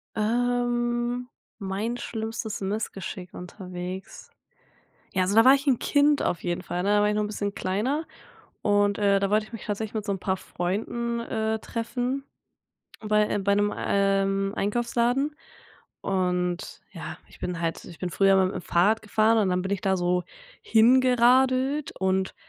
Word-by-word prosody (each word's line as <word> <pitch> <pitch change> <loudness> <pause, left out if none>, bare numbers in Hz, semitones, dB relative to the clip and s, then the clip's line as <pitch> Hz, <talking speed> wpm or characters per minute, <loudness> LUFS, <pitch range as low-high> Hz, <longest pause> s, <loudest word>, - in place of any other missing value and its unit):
Ähm, 240 +1 0 0.3
mein 205 +4 -3
schlimmstes 220 -3 -4
Missgeschick 195 -2 -4
unterwegs. 180 0 -8 0.8
Ja, 185 - +1
also 190 +2 0
da 225 +1 +7
war 260 +1 +8
ich 280 +1 -2
'n 260 -4 +3
Kind 290 0 +3
auf 175 - -1
jeden 175 0 -2
Fall, 180 -1 -3
ne? 200 - +1
Da - - +4
war 210 - +3
ich 210 - +1
noch 210 - +1
'n - - -1
bisschen 205 -1 -3
kleiner 250 +12 -1 0.6
und, 205 -1 +2
äh, 200 -1 +3
da 195 0 0
wollte 215 +1 +2
ich 225 - -19
mich 230 - -7
tatsächlich 215 0 -3
mit 215 -1 -2
so 205 - -1
'n 195 - -2
paar 190 0 -1
Freunden, 225 +7 -3
äh, 220 -1 -2
treffen 245 +4 -3 0.8
bei, 210 -1 +2
äh 205 - 0
bei 200 0 +2
'nem, 205 0 +1
ähm, 195 0 +1
Einkaufsladen 240 +7 0 0.7
und 180 -1 -1
ja, - - -7
ich - - -17
bin 180 -2 -3
halt 165 -1 -2
ich 170 - -12
bin 180 - -3
früher 195 +3 +4
immer 190 -1 +4
mit 190 - -4
'm - - -3
Fahrrad 200 +7 +2
gefahren 220 +1 +3
und 200 -4 +2
dann 180 0 0
bin 190 +2 -3
ich 200 - -1
da 190 -1 +2
so 180 0 0 0.4
hingeradelt 255 +4 +4
und 190 0 0
210 Hz, 170 wpm, -26 LUFS, 190-240 Hz, 0.8 s, war